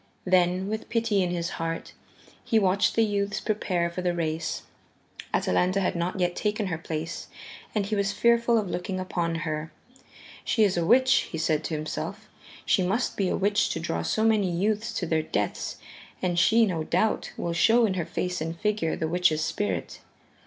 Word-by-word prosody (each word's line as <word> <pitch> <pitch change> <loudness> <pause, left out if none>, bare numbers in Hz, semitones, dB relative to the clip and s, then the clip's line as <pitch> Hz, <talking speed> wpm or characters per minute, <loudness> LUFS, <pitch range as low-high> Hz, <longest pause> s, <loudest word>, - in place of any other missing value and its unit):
Then, 180 0 +2
with 215 +1 -4
pity 225 -3 +1
in 180 - 0
his 170 -1 -2
heart, 165 0 -4 0.5
he 225 - +2
watched 200 -1 +2
the 225 - +4
youths 205 0 -1
prepare 185 -6 0
for 180 - -4
the 175 -1 0
race. 160 -1 -2 0.7
Atalanta 185 +2 +2
had 190 - 0
not 175 +2 -2
yet 175 -1 +1
taken 210 0 -1
her 170 -4 -2
place, 165 +1 -5 0.5
and 205 -2 +1
he 210 +2 -1
was 200 -1 +1
fearful 235 +1 +3
of 210 -3 0
looking 185 +1 -3
upon 175 -2 -2
her. 155 0 -3 0.7
"She 220 - +2
is 200 -3 +3
a 170 - +1
witch," 260 +8 +4
he 165 - -5
said 155 -1 +1
to 160 - -2
himself, 155 +1 -5 0.4
"she 195 - +3
must 200 +7 0
be 195 -3 0
a - - 0
witch 205 +1 +2
to - - -3
draw 85 - -2
so 215 - 0
many 215 -4 +3
youths 210 +6 0
to 180 - -2
their 160 -1 +1
deaths, 105 -9 -2 0.4
and 175 -2 0
she, 225 +6 +5
no 170 -6 -1
doubt, 185 +7 0
will 170 - -2
show 230 +7 +4
in 200 - 0
her 175 -3 -2
face 180 -2 -2
and 165 +1 -4
figure 210 -6 0
the 160 - -2
witch's 160 -2 +2
spirit." 100 - -2
180 Hz, 190 wpm, -26 LUFS, 165-210 Hz, 0.7 s, she